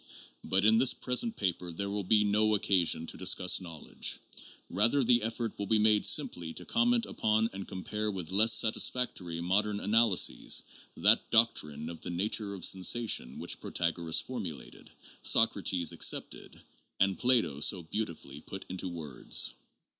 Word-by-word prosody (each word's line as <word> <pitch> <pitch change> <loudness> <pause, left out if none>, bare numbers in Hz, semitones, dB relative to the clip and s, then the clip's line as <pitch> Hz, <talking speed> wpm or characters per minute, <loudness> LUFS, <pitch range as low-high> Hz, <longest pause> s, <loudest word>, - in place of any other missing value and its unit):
But 95 +2 0
in 110 +1 +4
this 130 +1 +4
present 220 - 0
paper 90 - -3
there 100 +4 -5
will 100 0 -3
be 105 +3 +2
no 105 +1 +2
occasion 90 -5 +1
to - - -5
discuss 90 +1 +2
knowledge; 85 -4 -3 0.5
rather 115 +9 +2
the 120 0 +3
effort 115 0 -5
will 100 - -4
be 110 - +2
made 105 -1 +3
simply 80 -2 +1
to - - -5
comment 235 0 +1
upon 110 - -1
and 95 0 -8
compare 105 +3 -5
with 95 -4 -6
less 110 +4 +5
satisfactory 110 -6 +1
modern 100 +4 -1
analyses 105 - +1 0.3
that - - +3
doctrine 75 -10 +2
of 85 -1 -9
the - - -6
nature 100 +3 -1
of 95 - -10
sensa 110 +5 +2
tions 60 - -1
which - - -4
Protagoras 85 -1 -1
formulated, 80 - -8 0.3
Socrates 95 -6 +2
accepted, - - -1 0.4
and 95 -1 +1
Plato 120 - +2
so 90 +4 +1
beautifully 80 -6 -6
put 95 +3 -10
into 95 0 -5
words. 80 -7 -1
100 Hz, 150 wpm, -29 LUFS, 85-110 Hz, 0.5 s, less